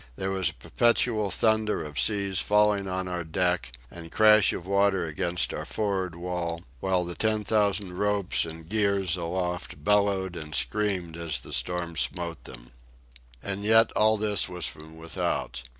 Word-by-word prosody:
There 95 +6 -3
was 95 -1 +1
a - - -11
perpetual 110 - +1
thunder 110 -3 +1
of 75 -1 -5
seas 100 -3 +2
falling 105 -1 +2
on 95 0 -3
our 90 -1 -3
deck 90 -3 -1 0.2
and 85 -1 -10
crash 110 -2 +5
of 85 - -6
water 100 -2 +2
against 85 +3 -2
our - - -4
for'ard 95 -5 -2
wall; 85 -1 -4 0.2
while 95 +1 0
the 90 - -4
ten 110 +2 0
thousand 100 -2 +1
ropes 105 -2 +1
and 80 0 -8
gears 100 -3 +1
aloft 90 -3 -4
bellowed 100 -1 +1
and 75 -2 -6
screamed 95 -6 -1
as 85 -2 -3
the - - -9
storm 85 -2 -1
smote 85 +2 -2
them. - - -11 0.7
And 100 0 -3
yet 110 +1 +5
all 110 0 +3
this 105 -2 +2
was 90 -2 -3
from 80 +1 -7
without. 85 +2 -3
95 Hz, 160 wpm, -27 LUFS, 85-105 Hz, 0.7 s, crash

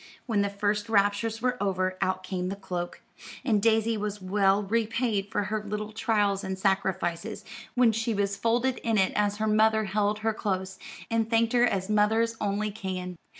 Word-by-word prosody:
When 220 -5 +1
the 200 - +1
first 205 +1 -1
raptures 215 +2 +1
were 250 -2 0
over, 185 -2 0
out 185 0 0
came 185 -1 -3
the 195 - -3
cloak; 180 -3 -5 0.4
and 215 -5 +2
Daisy 225 0 +2
was 210 0 -3
well 195 +1 +2
repaid 225 0 0
for - - 0
her 210 +1 -2
little 210 +1 -4
trials 210 -3 +1
and 190 0 -3
sacrifices 190 -3 -1 0.3
when 245 -2 +5
she 225 0 -1
was 200 0 0
folded 240 +5 +1
in 225 -2 0
it 190 -1 +2
as 205 0 +1
her 220 - -1
mother 220 0 +3
held 205 +1 0
her 225 - +2
close, 190 -3 -3 0.3
and 225 -1 +1
thanked 230 0 +2
her 245 0 +5
as 190 -5 -1
mothers 220 +2 +2
only 210 +1 -1
can. 185 -3 -5
210 Hz, 180 wpm, -27 LUFS, 195-225 Hz, 0.4 s, when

